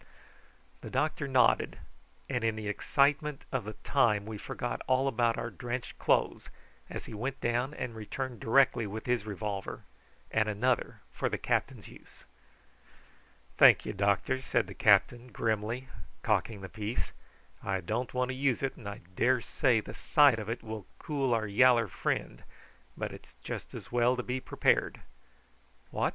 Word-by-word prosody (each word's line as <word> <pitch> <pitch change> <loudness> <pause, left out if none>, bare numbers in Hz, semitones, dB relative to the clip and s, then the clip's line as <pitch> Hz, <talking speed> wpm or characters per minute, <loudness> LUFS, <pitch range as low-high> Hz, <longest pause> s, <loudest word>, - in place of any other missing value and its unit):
The - - -7
doctor 150 +2 -1
nodded, 130 -2 +3 0.5
and 120 -4 -2
in 115 -1 +1
the 110 -1 -5
excitement 140 +6 +1
of 130 -5 -1
the 110 - -5
time 105 -7 +2
we 110 -1 -6
forgot - - -4
all 130 +1 +3
about 120 -3 +1
our 120 - -3
drenched 120 +6 -5
clothes - - +1 0.4
as - - -6
he - - -9
went 125 +6 -3
down 120 +5 0
and 115 - -4
returned 120 +2 -5
directly 120 -1 +3
with 110 +2 -6
his 120 -3 0
revolver, 100 -1 -4 0.5
and 110 -1 +2
another 120 +4 0
for - - -1
the - - -2
captain's - - -1
use. - - -16 1.4
"Thank'ye, - - +7
doctor," 100 +6 +1
said 120 -4 +1
the 95 - -9
captain 120 +5 +3
grimly, 110 +4 -1 0.4
cocking 110 -4 0
the 95 - -6
piece. 105 +3 -4 0.5
"I 95 -1 -1
don't 110 +8 -2
want 125 0 0
to - - -1
use 135 -1 +1
it, 135 - -2
and 100 - -7
I 100 - -8
daresay 120 0 +2
the - - -9
sight 145 -6 +4
of 105 0 -5
it 115 - -3
will 110 -2 -7
cool 140 -4 -1
our 115 -2 +2
yaller 115 +2 +5
friend; 70 -7 -2 0.6
but - - -3
it's 65 - -13
just - - -6
as - - -9
well 120 +1 +3
to 125 - -2
be 125 +2 -2
prepared. - - +1 0.9
What! - - +1
120 Hz, 160 wpm, -30 LUFS, 105-130 Hz, 1.4 s, Thank'ye